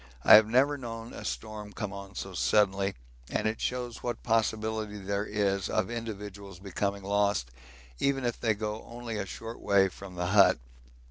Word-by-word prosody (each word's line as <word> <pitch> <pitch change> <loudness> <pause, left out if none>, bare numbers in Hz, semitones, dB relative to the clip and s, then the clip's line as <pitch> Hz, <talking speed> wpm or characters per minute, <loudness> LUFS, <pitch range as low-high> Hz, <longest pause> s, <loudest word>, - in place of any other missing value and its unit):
I - - +8
have 110 0 +10
never 140 +5 +3
known 115 -2 -7
a - - -8
storm 105 -1 -5
come 105 -3 -4
on 100 0 -9
so 95 - -5
suddenly, 100 +1 +2 0.3
and - - 0
it 110 +1 -2
shows 125 -2 -3
what 120 -2 -4
possibility 110 -1 0
there 100 +1 -2
is 100 -2 0
of 95 - 0
individuals 105 -4 -6
becoming 100 +1 -3
lost 100 -10 +1 0.5
even 135 -2 +1
if 120 - -1
they 110 -2 +2
only 110 +2 -5
go 105 - -1
a - - -4
short 115 +3 -7
way 100 -2 +4
from 95 0 -11
the 90 0 -2
hut. 100 -10 +7
105 Hz, 175 wpm, -29 LUFS, 100-115 Hz, 0.5 s, have